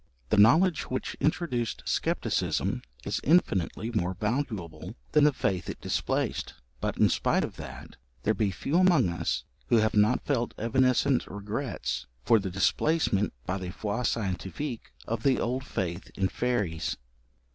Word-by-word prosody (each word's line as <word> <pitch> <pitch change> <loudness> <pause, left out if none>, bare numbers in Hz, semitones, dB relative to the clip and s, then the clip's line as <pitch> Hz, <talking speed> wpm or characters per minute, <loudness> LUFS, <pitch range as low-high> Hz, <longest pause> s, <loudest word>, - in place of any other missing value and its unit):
The 105 - +2
knowledge 150 - +5
which 130 - -3
introduced 150 -8 -1
scepticism - - 0 0.2
is - - -1
infinitely 115 - +2
more 95 -5 -1
valuable 105 - -3 0.2
than 150 -1 +5
the 150 - +6
faith 95 -8 -1
it - - -5
displaced; - - -1 0.2
but, - - -2
in - - +5
spite - - +1
of - - -5
that, - - -9 0.3
there 110 - +3
be 105 -1 +1
few 140 - -1
among 175 - +5
us 85 - -1 0.2
who 120 - +4
have 110 0 +2
not 105 +4 +3
felt 120 -5 0
evanescent 130 +3 +2
regrets 100 - -4 0.2
for 115 -2 +5
the 95 -1 -3
displacement 105 - +1
by 95 +2 -2
the 90 -1 -5
foi 105 +5 -3
scientifique 115 - -3
of 115 -1 -2
the 130 +1 +3
old 125 +3 -1
faith 90 -5 -4
in 95 -1 +1
fairies. 100 - -1
115 Hz, 145 wpm, -28 LUFS, 95-130 Hz, 0.3 s, the